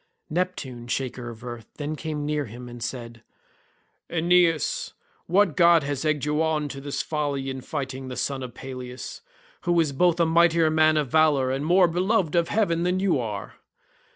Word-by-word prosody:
Neptune, 150 -9 -3
shaker 125 -1 -3
of 115 -1 -10
the - - -11
earth, 120 -2 -7
then 150 +1 -4
came 150 -1 -4
near 150 -1 -1
to - - -11
him 120 +3 -9
and 120 -1 -8
said, 120 -1 -6 0.9
"Aeneas, 170 -1 +2 0.3
what 185 -2 +3
god 170 -3 +6
has 140 0 -3
egged 150 -2 0
you 150 +1 +1
on 155 -2 0
to 135 - -7
this 140 0 -3
folly 145 -3 -2
in 130 0 -6
fighting 135 -2 -5
the 130 - -6
son 135 -1 -2
of 125 -2 -7
Peleus, 130 -1 -7 0.4
who 175 -1 +3
is 155 -3 +2
both 175 +5 +2
a 170 - +5
mightier 165 -1 +4
man 155 0 +4
of 145 -4 0
valour 150 -4 +3
and 135 +3 -2
more 180 +1 +5
beloved 180 0 +1
of 170 -1 +2
heaven 175 -6 +1
than 180 +1 +1
you 190 -7 +2
are? 105 -4 -5
150 Hz, 185 wpm, -25 LUFS, 130-170 Hz, 0.9 s, god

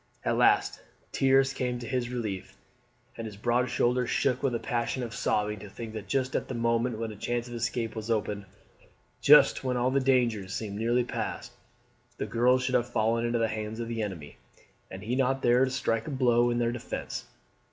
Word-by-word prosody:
At - - +2
last - - +3 0.3
tears 135 0 +3
came 125 -1 -2
to 120 - -7
his 125 -2 -1
relief, 110 -6 -5 0.6
and 115 -1 -5
his 105 -2 -9
broad 120 +3 +1
shoulders 125 0 +1
shook 130 -2 +1
with 135 -4 0
a - - -1
passion 120 +1 -2
of 115 -1 -5
sobbing 105 -2 0
to 105 - -10
think 110 +2 -8
that 110 -2 -7
just 130 -1 -1
at - - -1
the 130 - -5
moment 115 0 0
when 115 0 -3
a - - -9
chance 120 +3 -2
of 120 - -9
escape 120 -1 -2
was 110 0 -5
opened 105 -2 -1 0.8
just 150 -1 +6
when 125 -1 0
all 125 +1 +1
the 140 - +3
dangers 120 -7 +1
seemed 105 -2 -4
nearly 120 +2 +2
past - - -4 0.7
the - - -2
girls 125 +2 +2
should 130 - -1
have 120 -1 +2
fallen 115 0 +1
into 120 0 0
the 115 -1 +2
hands 110 0 -4
of 115 - -3
the 115 -1 -3
enemy, 90 -8 -6 0.5
and 95 +2 -8
he 120 +4 -1
not 135 0 +1
there 120 +2 +5
to - - -2
strike 115 -4 -1
a - - -3
blow 120 -3 +3
in 120 - 0
their 120 -1 +1
defence. 120 - -5
120 Hz, 205 wpm, -28 LUFS, 110-125 Hz, 0.8 s, just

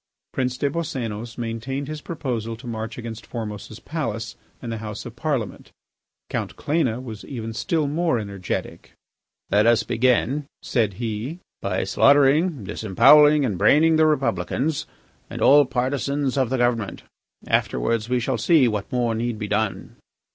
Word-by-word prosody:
Prince 125 -1 -1
des 140 +1 0
Boscénos 120 -8 -4
maintained 120 +4 -4
his 155 0 -6
proposal 120 -9 -4
to 120 +3 -14
march 110 -1 -5
against 115 -2 -7
Formose's 110 -1 -7
palace 115 -9 -4 0.2
and 120 - -6
the 115 - -4
House 105 -1 -6
of 120 -1 -8
Parliament. 130 -4 -3 0.6
Count - - -3
Cléna 140 -7 0
was 110 -4 -8
even 115 -4 -6
still 155 +6 0
more 160 -1 +1
energetic. 100 -4 -5 0.6
"Let 105 +2 +4
us 115 -1 +4
begin," 130 +4 +1 0.2
said 110 -6 +1
he, 115 - -4 0.2
"by 95 -1 -1
slaughtering, 140 - +4
disembowelling, 140 +10 +5
and 100 -8 -2
braining 160 - +5
the 155 0 +5
Republicans 135 - 0 0.4
and - - -6
all 145 +1 +6
partisans 135 +2 -1
of 130 -4 +1
the 130 - 0
government. 120 -4 0 0.4
Afterwards 115 0 0
we 125 0 +2
shall 120 0 -1
see 135 +2 +4
what 105 0 -3
more 120 -3 +1
need 115 0 -2
be 105 -1 -4
done." 105 -3 -2
120 Hz, 145 wpm, -23 LUFS, 110-140 Hz, 0.6 s, all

